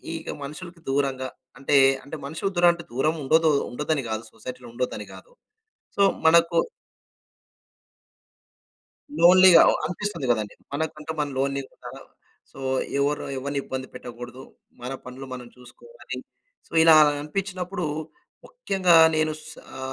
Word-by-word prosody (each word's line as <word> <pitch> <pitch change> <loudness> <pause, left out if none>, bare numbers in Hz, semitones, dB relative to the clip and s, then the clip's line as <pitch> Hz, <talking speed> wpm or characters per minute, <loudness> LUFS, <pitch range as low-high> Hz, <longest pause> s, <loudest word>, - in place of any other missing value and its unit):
ఇక 165 - -6
మనుషులకి 170 +4 -9
దూరంగా 135 -2 -1 0.3
అంటే 135 +2 0 0.3
అంటే 140 +3 -8
మనుషుల 160 +7 -3
దూర 175 - +4 0.3
దూరం 150 +6 0
ఉండదు 160 +4 +4 0.2
ఉండ్డోదని 150 +1 -2
కాదు. 110 +1 -3
సొసైటీలో 125 +2 -9
ఉండ్డోదని 125 +1 -3
కాదు. - - -14 0.6
సో, - - 0 0.2
మనకు 170 +1 +5 2.6
లోన్లీ‌గా 180 0 +8
ఆహ్, - - +2
అనిపిస్తుంది 175 -2 -4
కదండీ. 105 -3 -2 0.2
మనకంటూ 155 +1 -4
మనం 145 -1 -1
లోన్లీ‌గా. 140 0 -4 0.6
సో, - - -14 0.4
ఎవరు 145 +1 0
ఎవరిని 140 +1 -3
ఇబ్బంది 130 0 -5
పెట్టకూడదు. 120 +2 -9 0.4
మన 125 - -5
పనులు 130 +2 -9
మనం 125 -1 -8
చూసుకోవాలి. 470 - -11 0.5
సో, - - -31
ఇలా 165 -1 +8 0.3
అనిపించినప్పుడు 180 +2 -4 0.6
ముఖ్యంగా 195 - +1 0.2
నేను 155 0 +1 0.2
సా 155 - -12
150 Hz, 115 wpm, -24 LUFS, 130-170 Hz, 2.6 s, లోన్లీ‌గా